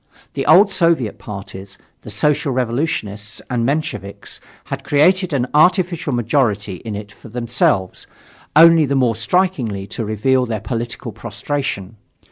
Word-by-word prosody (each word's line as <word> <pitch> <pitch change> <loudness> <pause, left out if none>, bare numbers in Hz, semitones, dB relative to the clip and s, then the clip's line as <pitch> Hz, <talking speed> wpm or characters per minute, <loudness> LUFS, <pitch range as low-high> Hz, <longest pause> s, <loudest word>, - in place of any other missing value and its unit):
The - - -3
old 195 +6 +6
Soviet 165 - +1
parties, 100 -1 -8 0.2
the - - -10
Social 140 +6 +1
Revolutionists 115 -5 -2
and 120 -1 0
the - - 0
Mensheviks, 140 -8 -3 0.2
had - - -6
created 180 +5 +3
an 135 -4 +1
artificial 170 0 +3
majority 115 -5 0
in 110 +3 -6
it 105 0 -7
for 110 - -14
themselves, 115 -5 0 0.5
only 165 -1 +7
the 140 - 0
more 125 -4 +2
strikingly 115 - 0
to 115 - -5
reveal 125 +5 +1
their 110 -2 -2
political 115 +3 -4
prostration. 115 0 -4
120 Hz, 135 wpm, -19 LUFS, 105-150 Hz, 0.5 s, only